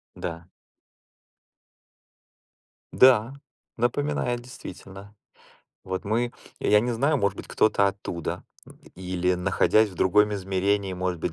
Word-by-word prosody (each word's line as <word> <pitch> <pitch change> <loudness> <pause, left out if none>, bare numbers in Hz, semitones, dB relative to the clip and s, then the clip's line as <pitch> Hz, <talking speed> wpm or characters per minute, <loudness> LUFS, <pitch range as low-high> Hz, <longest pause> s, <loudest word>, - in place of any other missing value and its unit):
Да. 85 0 -6 2.5
Да. 125 -1 +5 0.4
Напоминает, 120 0 -1
действительно. 100 -4 -11 0.7
Вот 95 +1 -4
мы 120 +3 0 0.3
я 105 0 +4
не 125 - -1
знаю, 140 +6 +1
может 100 -5 0
быть, - - -8
кто-то 100 -2 +2
оттуда 95 -4 -4 0.5
или, 90 0 -1
находясь 95 +4 +2
в 95 - -13
другом 105 +3 +3
измерении, 95 0 -1
может 90 -1 -2
быть 85 - -2
100 Hz, 105 wpm, -25 LUFS, 95-115 Hz, 2.5 s, Да